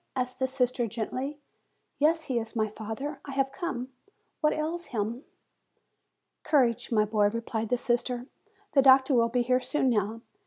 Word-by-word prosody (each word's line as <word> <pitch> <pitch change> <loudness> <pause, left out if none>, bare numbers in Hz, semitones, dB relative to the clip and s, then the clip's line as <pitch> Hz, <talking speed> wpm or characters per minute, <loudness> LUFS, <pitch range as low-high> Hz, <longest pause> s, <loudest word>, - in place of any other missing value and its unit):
said 250 -1 0
the 260 - +1
sister 255 -2 0
gently. 255 +6 -4 0.6
"Yes, 320 +2 +3
he 255 -5 -1
is 225 0 -6
my 215 -1 +1
father; 225 +7 -6
I 275 - -7
have 270 0 +1
come. 270 -6 -4 0.5
What 300 -1 +3
ails 330 +3 -3
him?" 230 +3 -3 1.2
"Courage, 245 -7 +2
my 215 -2 +3
boy," 210 -1 +2
replied 225 0 -3
the 250 - +2
sister; 240 +1 -1 0.5
"the 275 - +5
doctor 265 +1 +6
will 230 -2 +4
be 245 +1 +1
here 255 +1 +2
soon 265 -2 +1
now." 215 +1 -1
250 Hz, 160 wpm, -28 LUFS, 230-275 Hz, 1.2 s, doctor